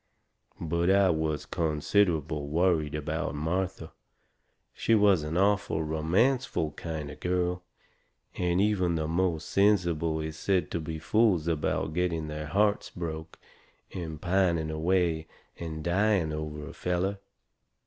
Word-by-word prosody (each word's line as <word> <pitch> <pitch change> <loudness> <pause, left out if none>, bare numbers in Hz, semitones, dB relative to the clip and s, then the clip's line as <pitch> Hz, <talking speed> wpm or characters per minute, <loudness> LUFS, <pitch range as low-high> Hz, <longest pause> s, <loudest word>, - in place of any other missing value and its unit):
But 85 +2 0
I 95 -1 +5
was 80 -2 -1
considerable 80 -2 0
worried 80 -1 +1
about 75 +1 -3
Martha. 85 +2 -2 0.8
She 115 - +2
was 100 -5 +5
an 75 +3 -3
awful 95 -5 +2
romanceful 80 - +1
kind 80 -3 -5
of - - -12
girl. 90 0 0 0.7
And 90 0 +1
even 95 -4 +2
the 80 -1 -1
most 85 -1 0
sensible 85 -6 +2
kind 80 0 -2
is 80 - -10
said 95 -2 0
to 85 - -1
be 80 0 -5
fools 95 -1 +2
about 80 -1 -1
getting 85 -3 -1
their 75 0 -5
hearts 100 +4 +1
broke 80 -2 -6 0.6
and 80 -4 -5
pining 85 -3 +1
away 80 0 +1 0.3
and 80 -2 -5
dying 90 -2 +2
over 75 -1 -5
a - - -9
feller. 90 +3 -1
85 Hz, 130 wpm, -28 LUFS, 80-95 Hz, 0.8 s, I